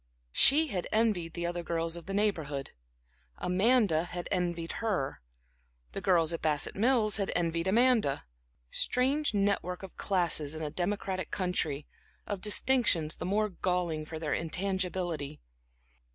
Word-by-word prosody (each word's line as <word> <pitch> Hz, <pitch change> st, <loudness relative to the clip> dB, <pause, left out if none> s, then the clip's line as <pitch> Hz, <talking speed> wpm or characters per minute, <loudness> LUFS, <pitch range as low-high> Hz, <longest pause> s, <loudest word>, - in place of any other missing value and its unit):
She 305 Hz, -, +6 dB
had 185 Hz, -6 st, -3 dB
envied 210 Hz, -7 st, +1 dB
the 170 Hz, -1 st, -3 dB
other 175 Hz, 0 st, -2 dB
girls 165 Hz, 0 st, -1 dB
of 170 Hz, +1 st, -9 dB
the 195 Hz, -, -4 dB
Neighborhood, 160 Hz, -10 st, -1 dB, 0.7 s
Amanda 190 Hz, -3 st, +2 dB
had 175 Hz, 0 st, -6 dB
envied 175 Hz, -3 st, -1 dB
her, 190 Hz, -12 st, -1 dB, 0.7 s
the -, -, -5 dB
girls 170 Hz, -3 st, +3 dB
at 165 Hz, -, -4 dB
Bassett 150 Hz, -2 st, 0 dB
Mills 220 Hz, -1 st, +3 dB
had 200 Hz, -2 st, -1 dB
envied 170 Hz, 0 st, 0 dB
Amanda. 225 Hz, -, +3 dB, 0.5 s
Strange 265 Hz, +1 st, +1 dB
net 200 Hz, 0 st, +2 dB
work 180 Hz, +1 st, -6 dB
of 195 Hz, -, -9 dB
classes 170 Hz, -6 st, +1 dB
in 155 Hz, -, -5 dB
a 150 Hz, -, -3 dB
democratic 185 Hz, +1 st, -2 dB
country, 155 Hz, -6 st, -1 dB, 0.4 s
of 200 Hz, -3 st, -4 dB
distinctions 210 Hz, -7 st, +2 dB
the -, -, -4 dB
more 210 Hz, +2 st, +1 dB
galling 180 Hz, -4 st, -1 dB
for 160 Hz, +1 st, -7 dB
their 155 Hz, -2 st, -2 dB
intangibility. 175 Hz, -3 st, -2 dB
180 Hz, 140 wpm, -30 LUFS, 165-205 Hz, 0.7 s, She